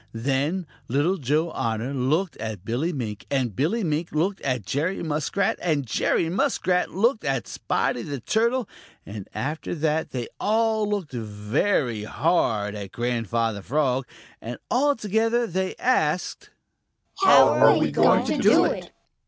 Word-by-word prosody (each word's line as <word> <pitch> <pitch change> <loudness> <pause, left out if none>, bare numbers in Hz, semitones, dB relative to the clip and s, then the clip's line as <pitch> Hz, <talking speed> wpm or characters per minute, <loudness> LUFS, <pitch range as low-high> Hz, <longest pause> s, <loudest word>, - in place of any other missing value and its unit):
Then 140 +10 -1 0.2
Little 145 +9 +1
Joe 155 +3 0
Otter 115 +2 -2
looked 150 +8 0
at 110 -3 -6
Billy 130 +10 -1
Mink, 110 -9 -5
and 130 -7 -1
Billy 195 - 0
Mink 160 0 -1
looked 185 +6 -1
at 125 -7 -2
Jerry 160 - -1
Muskrat, 155 +5 -1
and 155 -6 0
Jerry 145 +7 +1
Muskrat 185 -3 0
looked 225 +5 +1
at 135 -4 -1
Spotty 120 - -1
the 140 +3 -5
Turtle, 235 - 0 0.4
and 100 -1 -8
after 150 +5 -3
that 155 0 0
they 125 -3 -4
all 220 0 +1
looked 200 -7 -2
very 110 - -1
hard 110 -8 0
at 100 -2 -7
Grandfather 115 -3 -1
Frog, 130 +1 0 0.3
and 120 +2 -6
all 285 +3 +3
together 225 +2 +1
they 190 -1 -2
asked: 180 -9 0 0.7
"How 385 - +8
are - - +5
we - - +1
going - - +4
to - - -1
do - - +5
it?" - - -3
150 Hz, 145 wpm, -24 LUFS, 120-190 Hz, 0.7 s, How